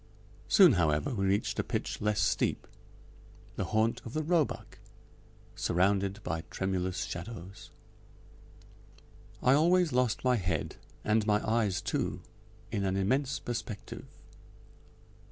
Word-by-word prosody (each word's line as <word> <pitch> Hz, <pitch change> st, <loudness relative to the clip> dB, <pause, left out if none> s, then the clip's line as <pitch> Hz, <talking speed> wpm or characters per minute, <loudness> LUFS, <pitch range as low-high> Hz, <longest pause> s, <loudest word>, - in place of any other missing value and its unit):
Soon, 185 Hz, -8 st, +7 dB
however, 80 Hz, -, +1 dB
we 95 Hz, -4 st, 0 dB
reached 100 Hz, +2 st, 0 dB
a -, -, +2 dB
pitch -, -, -3 dB
less 105 Hz, 0 st, +1 dB
steep: -, -, +1 dB, 0.9 s
the -, -, -2 dB
haunt 110 Hz, +1 st, +1 dB
of 115 Hz, -, -8 dB
the 155 Hz, -, -1 dB
roebuck, 165 Hz, -2 st, 0 dB, 0.8 s
surrounded 100 Hz, +2 st, +1 dB
by 80 Hz, +1 st, -2 dB
tremulous 95 Hz, -1 st, -2 dB
shadows. 95 Hz, +2 st, -7 dB, 1.7 s
I 130 Hz, -, +5 dB
always 170 Hz, +2 st, +4 dB
lost 125 Hz, -2 st, +1 dB
my 125 Hz, -1 st, +3 dB
head, 90 Hz, -7 st, -2 dB, 0.3 s
and 110 Hz, 0 st, +2 dB
my 105 Hz, 0 st, +2 dB
eyes 105 Hz, -5 st, +1 dB
too, -, -, -2 dB, 0.5 s
in 105 Hz, -3 st, -1 dB
an 95 Hz, 0 st, 0 dB
immense 130 Hz, +8 st, +1 dB
perspective. 115 Hz, -4 st, -6 dB
105 Hz, 120 wpm, -30 LUFS, 95-125 Hz, 1.7 s, Soon